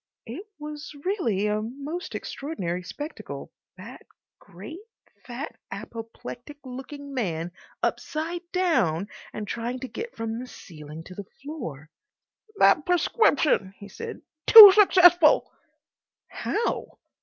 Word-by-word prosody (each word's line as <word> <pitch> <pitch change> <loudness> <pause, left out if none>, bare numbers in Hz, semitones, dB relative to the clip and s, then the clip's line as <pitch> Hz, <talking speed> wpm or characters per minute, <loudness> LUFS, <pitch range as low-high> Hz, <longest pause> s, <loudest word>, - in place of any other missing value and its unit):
It 300 - -8
was 300 0 -8
really 235 - 0
a 210 0 0
most 280 +10 -6
extraordinary 185 - -4
spectacle, 295 - -8 0.3
that - - -11 0.4
great, 205 - -11 0.5
fat, 255 +5 -7
apoplectic 235 +4 -9
looking 275 +2 -8
man 175 -9 -2 0.3
upside 330 +3 -2
down 205 - +1 0.2
and 210 -1 -6
trying 240 +3 -4
to 260 - -4
get 455 - -7
from 225 0 -4
the 255 - -7
ceiling 155 -7 -11
to 185 - -11
the 200 +2 -8 0.2
floor. 165 - -7 0.6
"That 315 -5 +5
prescription," 310 - +2
he 200 - -11
said. 455 - -8 0.2
"Too 430 -3 +13
successful." 355 -5 +6 0.8
"How?" 460 +3 -3
265 Hz, 110 wpm, -25 LUFS, 205-330 Hz, 0.8 s, Too